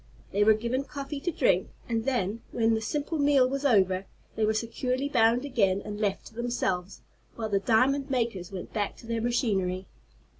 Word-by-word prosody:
They 205 +1 +3
were 220 +1 +6
given 235 +5 -1
coffee 280 0 -6
to 350 +5 -2
drink, - - +2 0.2
and 230 -1 -1
then, 230 -4 -1
when 225 -1 +2
the 220 - 0
simple 295 +6 -2
meal 280 -3 +5
was 275 +2 -3
over, 190 -6 +3 0.3
they 220 - 0
were 215 0 +3
securely 250 +4 -1
bound 235 -1 +3
again, 200 -8 +2
and 210 0 -5
left 200 -2 -1
to - - -12
themselves, 200 -6 -2 0.3
while 220 -2 -3
the 200 -1 +2
diamond 260 +7 +2
makers 230 -9 -1
went 185 -2 -7
back 205 -2 -1
to - - -14
their 230 0 -2
machinery. 195 -6 0
230 Hz, 185 wpm, -28 LUFS, 205-260 Hz, 0.3 s, were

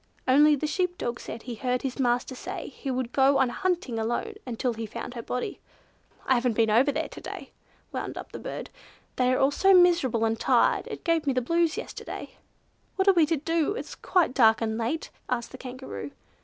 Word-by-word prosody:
Only 295 +3 +6
the 290 - -3
sheep 360 +3 -1
dog 235 0 -3
said 225 - -7
he 245 - -5
heard 250 +2 -1
his 270 0 -4
master 245 0 +1
say 255 - -6
he 275 - -7
would 255 -2 -2
go 275 +1 +4
on 265 -2 +3
hunting 340 -6 -1
alone, 240 - -2
until 245 0 -1
he 225 0 -5
found 215 - -6
her 235 - -5
body. 250 +2 -4 0.7
I - - +4
haven't 245 -2 +1
been 225 -1 +3
over 255 +7 +4
there - - -2
to - - -10
day," - - -8 0.4
wound - - -4
up - - -8
the - - -7
bird, - - -6 0.5
"they 250 0 +3
are 255 - +2
all 270 +1 +3
so 385 +6 +5
miserable 335 -11 +4
and 225 0 0
tired, - - +3
it - - -7
gave 330 -3 +1
me 275 - +3
the 255 - +2
blues 335 - +1
yesterday." 465 - -7 0.6
"What 380 0 0
are 390 - +8
we 330 -4 +4
to 325 0 +1
do? 330 +5 0
It - - -3
is - - -10
quite 355 -8 +1
dark 225 -4 +5
and 220 -1 -1
late!" 235 +8 -2 0.2
asked 235 -2 -2
the 260 - -10
Kangaroo. 260 +2 -7
260 Hz, 215 wpm, -27 LUFS, 240-320 Hz, 0.7 s, are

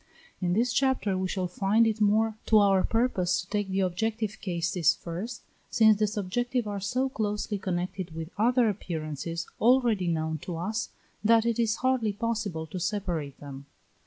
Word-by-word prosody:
In 175 -1 +1
this 240 +5 +1
chapter 260 -7 +1
we 185 0 -1
shall 185 -1 -2
find 200 +5 +2
it 220 -1 0
more 215 +1 +3
to 220 - +5
our 195 -2 +4
purpose 190 -7 +1
to 180 - -13
take 205 -2 -1
the 190 +1 0
objective 215 +4 -2
cases 175 -2 +1
first, 190 +8 -6 0.3
since 220 -1 +5
the 215 - +3
subjective 230 +4 -1
are 205 -1 -3
so 250 +7 0
closely 210 -4 -2
connected 180 -2 -3
with 165 +1 -6
other 240 +3 +3
appearances 165 -4 -4
already 235 -6 +3
known 160 -1 -1
to 175 +3 -6
us, 215 +7 -2 0.3
that 225 +1 +5
it 235 0 0
is 225 -1 +2
hardly 245 -5 +2
possible 210 -7 -2
to 170 +4 -6
separate 170 -8 -3
them. 140 -1 -9
205 Hz, 165 wpm, -28 LUFS, 175-225 Hz, 0.3 s, to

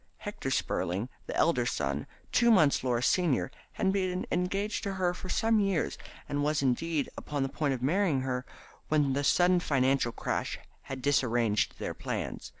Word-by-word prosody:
Hector - - -5
Spurling, 95 +7 -1 0.2
the - - -4
elder 125 -8 +2
son, 70 - -2 0.2
two 235 -1 +4
months 155 - +5
Laura's 125 -1 +1
senior, 165 -7 +2 0.2
had 190 -2 +1
been 185 -2 -1
engaged 195 +4 -1
to 200 -2 -3
her 185 -2 0
for 185 +1 -8
some 225 +2 +2
years, 195 -4 0 0.3
and 145 0 -1
was, 150 -1 +1
indeed, 145 +4 +1
upon 145 -2 -3
the 135 - -1
point 140 -1 0
of 125 - -7
marrying 165 -1 +2
her 130 -1 -2 0.4
when 150 -3 +2
the 140 +1 0
sudden 180 +5 +4
financial 135 -5 +2
crash - - -2 0.2
had 130 -1 -7
disarranged 120 -6 +2
their - - -4
plans. - - -4
145 Hz, 165 wpm, -30 LUFS, 130-180 Hz, 0.4 s, months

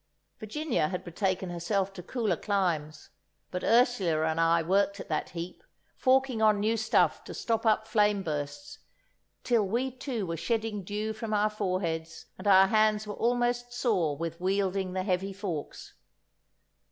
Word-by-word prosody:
Virginia 230 - -1
had 180 +2 -4
betaken 185 +1 -2
herself 190 +3 -1
to 180 - -8
cooler 215 0 -1
climes, 165 -6 -2 0.4
but 180 - -4
Ursula 220 -10 +3
and 160 0 0
I 165 0 +3
worked 200 +3 +1
at - - -8
that - - -1
heap, 170 - -7 0.3
forking 260 -3 +2
on 215 -2 +4
new 220 +2 +1
stuff 220 0 +2
to - - -8
stop 225 0 -1
up 220 0 +2
flame 210 -2 +2
bursts, 145 -2 -5 0.6
till 235 -4 +3
we 245 +6 -1
too 250 -4 -4
were 165 -1 -3
shedding 220 0 -2
dew 210 +3 -3
from 220 -1 -3
our 210 +1 +2
foreheads, 180 -6 -3
and 190 - -5
our 190 -1 +7
hands 215 +1 +2
were 210 - -5
almost 245 +1 0
sore 190 - 0
with 165 +1 -5
wielding 190 0 0
the 185 0 -1
heavy 190 0 -1
forks. 185 -7 -6
200 Hz, 155 wpm, -29 LUFS, 175-220 Hz, 0.6 s, our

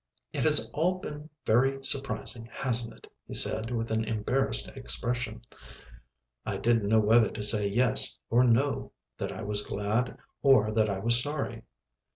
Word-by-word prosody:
"It - - -2
has - - +5
all 175 +5 0
been 150 -4 -9 0.2
very 135 +4 +1
surprising, 135 -4 -3
hasn't 120 -3 -2
it?" - - -17 0.2
he - - -5
said 110 +1 +3
with 115 -2 -3
an 110 0 0
embarrassed 110 - -1
expression. 120 -2 -3 1.0
I - - -4
didn't 115 -3 +1
know 110 0 +4
whether 110 +1 +4
to 105 - -6
say 105 -1 +3
"yes" 115 +4 +3
or 120 +2 +4
"no," 125 +4 0 0.3
that - - -4
I - - -7
was 105 0 0
glad 105 +5 -2 0.2
or 120 -6 +4
that 110 0 +1
I 100 - -2
was 115 +4 +6
sorry. 135 -5 -5
115 Hz, 160 wpm, -28 LUFS, 110-130 Hz, 1.0 s, was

